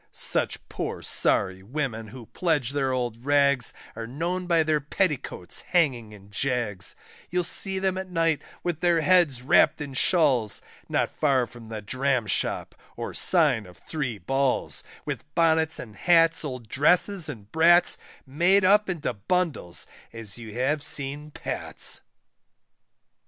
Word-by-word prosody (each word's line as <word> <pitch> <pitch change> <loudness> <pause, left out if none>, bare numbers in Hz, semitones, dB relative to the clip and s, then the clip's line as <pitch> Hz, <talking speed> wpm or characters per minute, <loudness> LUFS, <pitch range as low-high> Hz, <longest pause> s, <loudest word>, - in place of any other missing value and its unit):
Such - - -1
poor - - -5
sorry 95 -1 +1
women 115 0 -4
who 120 +2 -11
pledge 150 - -1
their 135 -2 0
old 120 -2 -3
rags, 140 -2 +2 0.2
Are 115 0 -6
known 175 +8 -3
by 165 -2 +3
their 155 -1 +1
petticoats 150 - -1
hanging 130 -11 0
in 100 -1 -15
jags; 110 -5 -2 0.3
You'll 180 0 0
see 190 +2 0
them 190 0 0
at 190 0 -6
night 165 -3 +1 0.2
with 175 -3 -2
their 175 -2 +2
heads 155 -7 +3
wrapt 130 - +4
in 145 -2 -6
shawls 130 - +2 0.3
Not - - 0
far 135 -4 +2
from 115 -1 -13
the 110 -2 -6
Dram 130 +1 0
shop, 105 - -1 0.2
or - - -5
sign 145 - +3
of 90 - -15
Three 140 -8 -4
Balls, 135 +7 0 0.2
With - - -4
bonnets 160 -1 +3
and 110 -3 -9
hats, 165 - +3
old 125 -6 -6
dresses 170 - +2
and 105 -7 -9
brats, 170 +2 +5 0.3
Made 175 +8 +3
up 205 +1 +4
into 160 -8 -2
bundles 140 - -1 0.3
as 110 -3 -7
you 115 -2 -9
have 135 +5 0
seen 145 +1 -3
Pat's. - - -2
140 Hz, 145 wpm, -26 LUFS, 120-165 Hz, 0.3 s, brats